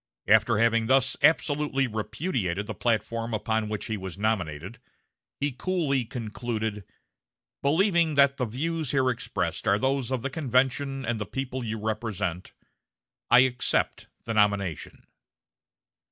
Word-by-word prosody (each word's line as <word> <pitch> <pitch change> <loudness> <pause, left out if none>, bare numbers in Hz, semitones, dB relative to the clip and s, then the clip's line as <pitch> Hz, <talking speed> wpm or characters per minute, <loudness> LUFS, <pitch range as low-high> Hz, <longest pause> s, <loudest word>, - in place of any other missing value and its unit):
After 110 +1 +5
having 115 0 +3
thus 130 0 +3
absolutely 145 -3 +2
repudiated 110 - -2
the - - -5
platform 115 0 -1
upon 110 0 -1
which 105 -1 -3
he 110 -3 -3
was 95 -2 -7
nominated, 95 - -2 0.6
he 145 0 0
coolly 140 -3 0
concluded: 110 -2 -4 0.8
"Believing 170 +1 +2
that 140 0 +5
the 125 - 0
views 155 +6 -2
here 130 -2 +2
expressed 95 -8 -3
are 100 - +4
those 130 +1 0
of 130 -3 -2
the 140 - -2
convention 135 -1 0
and 115 -1 -1
the 105 - -4
people 130 0 -4
you 110 -1 -3
represent, 105 -5 -3 0.8
I 120 +1 +8
accept 125 -1 0 0.2
the 115 - -3
nomination." 100 -5 0
120 Hz, 130 wpm, -27 LUFS, 105-135 Hz, 0.8 s, I